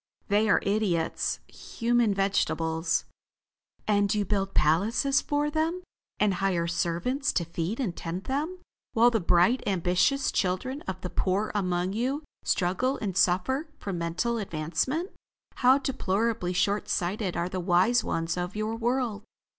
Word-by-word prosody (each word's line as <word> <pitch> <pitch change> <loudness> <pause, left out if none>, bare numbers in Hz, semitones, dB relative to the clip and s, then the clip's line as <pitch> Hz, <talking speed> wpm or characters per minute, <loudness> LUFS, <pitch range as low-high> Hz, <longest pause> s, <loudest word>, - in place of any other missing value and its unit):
"They 210 +2 +3
are - - +4
idiots; 195 -5 0
human 235 -2 0
vegetables." 165 -4 0 0.8
"And 205 -2 +2
you 205 -1 0
build 195 0 -1
palaces 210 - +3
for 295 0 0
them, 325 +4 -1 0.4
and 210 -2 +3
hire 185 -3 0
servants 170 - 0
to 170 - 0
feed 170 - -3
and 205 -10 -2
tend 175 +3 -5
them, 295 +9 -2 0.4
while 235 +2 +5
the 225 - +1
bright, 180 +7 +3
ambitious 185 +8 +2
children 230 +10 -1
of 185 -1 -4
the 180 - -5
poor 200 +3 0
among 180 -2 0
you, 260 +7 -1 0.2
struggle 190 +10 +1
and 195 -5 -3
suffer 230 - +1
for 200 - -5
mental 180 +8 -1
advancement. 195 - -2 0.5
How 255 +1 +5
deplorably 230 -7 -1
short 200 +3 0
sighted 185 +1 -1
are 170 - 0
the 185 0 -4
wise 185 +7 +3
ones 165 +1 -2
of 180 +2 -3
your 215 +1 -2
world. 235 -2 -1
200 Hz, 140 wpm, -27 LUFS, 180-240 Hz, 0.8 s, while